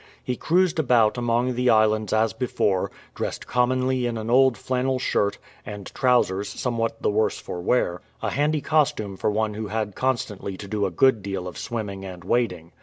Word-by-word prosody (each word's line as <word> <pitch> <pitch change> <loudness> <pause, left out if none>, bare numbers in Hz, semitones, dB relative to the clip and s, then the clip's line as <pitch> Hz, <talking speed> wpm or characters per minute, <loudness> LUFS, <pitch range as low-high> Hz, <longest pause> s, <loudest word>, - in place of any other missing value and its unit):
He 125 - -2
cruised 175 +4 +2
about 120 -7 +4
among 120 +1 +1
the 125 +1 +1
islands 110 -1 +3
as 110 0 +2
before 100 -6 0
— - - -28
dressed - - -4
commonly 130 0 +1
in 115 -1 -3
an 110 +1 -3
old 130 -1 +5
flannel 130 0 -1
shirt, 100 -5 0 0.3
and 105 -2 -8
trousers 105 -6 +2
somewhat 115 -3 -2
the - - +2
worse 110 +1 +1
for 90 - -6
wear 90 -4 +1
— - - -35
a - - 0
handy 150 +2 +1
costume 135 -11 +1
for 95 - 0
one 105 0 0
who 110 0 -4
had 105 -1 -2
constantly 105 -7 -2
to 100 - -8
do 100 0 0
a - - -2
good 115 +5 +3
deal 95 -2 -4
of 90 - -7
swimming 100 -4 -5
and 90 -2 -8
wading. 115 -9 -1
115 Hz, 190 wpm, -24 LUFS, 100-125 Hz, 0.3 s, old